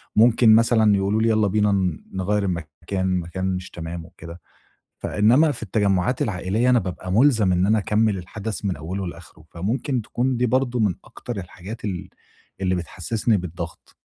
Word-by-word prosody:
ممكن 115 0 +6
مثلًا 110 -2 +4
يقولوا 100 +3 +1
لي: 115 - +3
"يالّا 110 -1 +3
بينا 105 +1 +2
ن 95 -5 0
نغيَّر 100 +2 0
المكان، 90 +2 -2
مكان 90 +2 -4
مش 90 0 -6
تمام." 85 0 -6
وكده، 85 +1 -12 0.6
فإنما 125 +9 +4
في 115 - -6
التَّجمُّعات 100 +2 +1
العائليّة 105 +5 0
أنا 125 -1 +5
بابقى 90 -1 -5
مُلزم 110 -4 +4
إن 90 +1 +2
أنا 110 +1 +3
أكمِل 105 0 +1
الحدث 105 +3 -6
من 95 - 0
أوله 90 +5 -4
لآخره، 80 -2 -11
فممكن 120 +8 -2
تكون 120 +3 -1
دي 125 - +2
برضو 125 0 +1
من 100 -6 +2
أكتر 120 -4 -7
الحاجات 95 +4 -8
ال 90 -4 -4 0.5
اللي 95 -1 +1
بتحسِّسني 100 +6 -1
بالضغط. 85 -1 -7
100 Hz, 160 wpm, -23 LUFS, 90-115 Hz, 0.6 s, ممكن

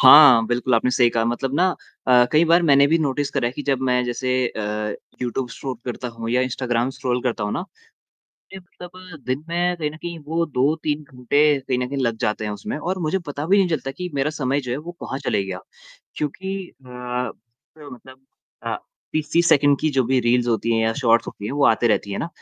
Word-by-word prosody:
हाँ, 130 -4 +9
बिल्कुल 120 +1 +1
आपने 115 +2 +2
सही 125 -1 +4
कहा 115 -1 0
मतलब 125 +3 -2
ना 180 +5 +3 0.4
अ, 125 -1 +6
कई 155 +2 +5
बार 170 +1 +4
मैंने 140 -3 +5
भी 165 +3 +3
नोटिस 145 -2 -1
करा 135 -4 0
है 120 - -2
कि 145 - -6
जब 140 -2 0
मैं 125 0 +2
जैसे 125 +1 -2 0.2
अ, 105 -1 -3 0.3
यूट्यूब 125 +1 -2
शूट 125 0 -6
करता 125 0 -4
हूँ 115 -1 -6
या 125 - +2
इंस्टाग्राम 125 -1 -1
स्क्रॉल 125 -2 -1
करता 120 -4 -1
हूँ 105 - -2
ना, 175 - -3 0.9
मैं - - -6
मतलब 180 -1 -12
दिन 130 +4 -2
में 175 +1 0
कहीं 155 -3 -2
न 155 - -11
कहीं 170 +1 -6
वो 165 +2 0
2-3 150 +2 0
घंटे 130 +1 -1 0.2
कहीं 130 -1 -2
न 125 0 -2
कहीं 140 +1 -4
लग 115 -2 0
जाते 105 0 -1
हैं 105 - -2
उसमें 105 - -5
और 185 +5 -3
मुझे 165 +5 +1
पता 145 +1 -4
भी 195 +4 +4
नहीं 190 -2 +3
चलता 155 -5 -2
कि 180 +6 -6
मेरा 140 +2 0
समय 140 -2 -1
जो 125 -3 -7
है, - - -1
वो 165 +4 -7
कहाँ 135 - -4
चले 120 -7 0
गया। 95 -1 -5 0.6
क्योंकि 190 +5 -4 0.2
अ, - - -13 0.9
मतलब 130 -2 -13 0.4
अ, - - -1 0.4
30-30 165 +2 +1
सेकंड 145 -1 +4
की 155 - +1
जो 130 -3 +2
भी 130 +1 +2
रील्स 120 +1 +2
होती 115 0 0
है - - +2
या 110 0 +2
शॉर्ट्स 115 -3 +3
होती 100 - -7
है, 110 - -4
वो 145 0 +2
आते 115 +2 +3
रहती 100 -2 0
है - - -3
ना, - - -3
135 Hz, 220 wpm, -22 LUFS, 120-155 Hz, 0.9 s, हाँ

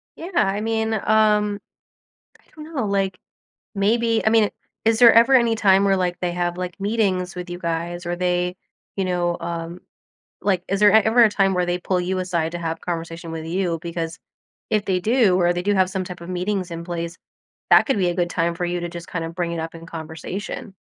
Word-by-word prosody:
Yeah. 340 +4 -8
I 200 - +2
mean, 220 0 -1
um, 210 -1 +2 0.8
I - - -30
don't 315 +1 -11
know. 245 -6 -1
Like, 195 -2 -1 0.6
maybe 225 +3 +1
I - - +5
mean, 220 -2 +4 0.4
is 225 +1 +3
there 235 -2 +8
ever 235 +4 +6
any 235 -3 +4
time 195 -2 +4
where, 195 -1 +3
like, 180 -1 -1
they 180 -1 -1
have, 175 0 -2
like, 180 0 -5
meetings 195 -3 0
with 180 0 -6
you 175 0 -6
guys 170 +1 -3
or 175 0 -2
they, 180 0 0 0.4
you 195 - -1
know, 175 -1 0
um, 170 +1 -5 0.6
like, 190 -3 +1
is 195 +1 -1
there 210 0 +7
a 220 - +7
ever 225 +3 +4
a 215 - +4
time 195 -2 +2
where 180 -1 +1
they 175 0 -1
pull 180 0 -1
you 185 +1 -2
aside 170 -3 -1
to 175 - -4
have 165 -1 -4
conversation 165 -1 -5
with 160 0 -5
you? 175 -1 -1
Because 165 -1 -5 0.5
if 210 -1 +1
they 185 -2 0
do 220 -3 +3
or 175 0 +3
they 175 0 -3
do 205 +1 +1
have 185 -1 +2
some 190 -1 -2
type 180 -1 -9
of 170 - -9
meetings 185 0 -2
in 170 0 -6
place, 170 0 -4 0.5
that - - +7
could 270 -7 +1
be 180 -2 +2
a 175 - -1
good 175 -1 -1
time 170 -1 0
for 175 +1 -3
you 175 0 -2
to 175 - -4
just 170 0 -9
kind 165 -2 -3
of 165 0 -6
bring 175 -1 -2
it 170 - -3
up 165 +1 -6
in 165 0 -10
conversation. 165 +5 -7
180 Hz, 225 wpm, -22 LUFS, 175-205 Hz, 0.8 s, there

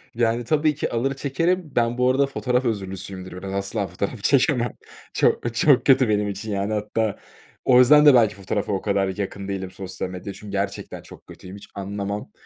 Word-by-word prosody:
Yani, 120 0 +1
tabii 155 +2 +1
ki - - -3
alır 120 +4 0
çekerim. 155 +5 -1
Ben 120 0 +1
bu 125 0 +3
arada 140 +2 +3
fotoğraf 125 -2 -1
özürlüsüyümdür 95 -3 -4
biraz, 95 +1 -6
asla 100 +1 -2
fotoğraf 100 +5 -5
çekemem. 125 -3 +2 0.4
Çok 115 -1 +1
çok 130 0 +4
kötü 130 -3 +5
benim 105 -1 +1
için 105 +2 -5
yani, 100 +1 -1
hatta 105 0 -1 0.5
o 125 -1 +6
yüzden 150 +4 +7
de 145 - +9
belki 115 -6 +4
fotoğrafa 100 +2 -3
o 95 - -1
kadar 100 -2 0
yakın 100 -1 -4
değilim, 95 -2 -4
sosyal 95 -1 -6
medyaya 90 +2 -7
çünkü 105 0 -11
gerçekten 100 0 -4
çok - - -15
kötüyüm, 95 +1 -11
hiç 100 - -13
anlamam. 100 +1 -5
105 Hz, 185 wpm, -23 LUFS, 100-125 Hz, 0.5 s, de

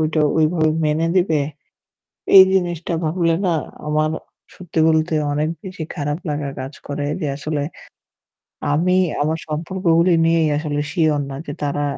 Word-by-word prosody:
ওইটা 155 0 +1 0.2
ওইভাবে 155 0 +2
মেনে 155 +2 +1
নেবে? 165 -5 +2 1.0
এই 190 - +12
জিনিসটা 175 -2 -1
ভাবলে 165 +1 +1
না 170 - +2 0.3
আমার 155 +1 +1 0.4
সত্যি 175 -3 -6
বলতে 160 0 +2 0.2
অনেক 150 +2 0
বেশি 185 -4 -6
খারাপ 145 +1 -2
লাগা 145 -1 -2
কাজ 130 +2 -6
করে। 145 0 -3
যে 155 - -1
আসলে 145 0 -3 1.1
আমি 180 +4 +2 0.3
আমার 160 +2 0
সম্পর্কগুলি 170 +2 +1
নিয়েই 165 -1 +3
আসলে 150 -1 -2
sure 155 -5 +1
না 135 - -6
যে 145 - -5
তারা 145 0 -1
155 Hz, 140 wpm, -20 LUFS, 150-170 Hz, 1.1 s, এই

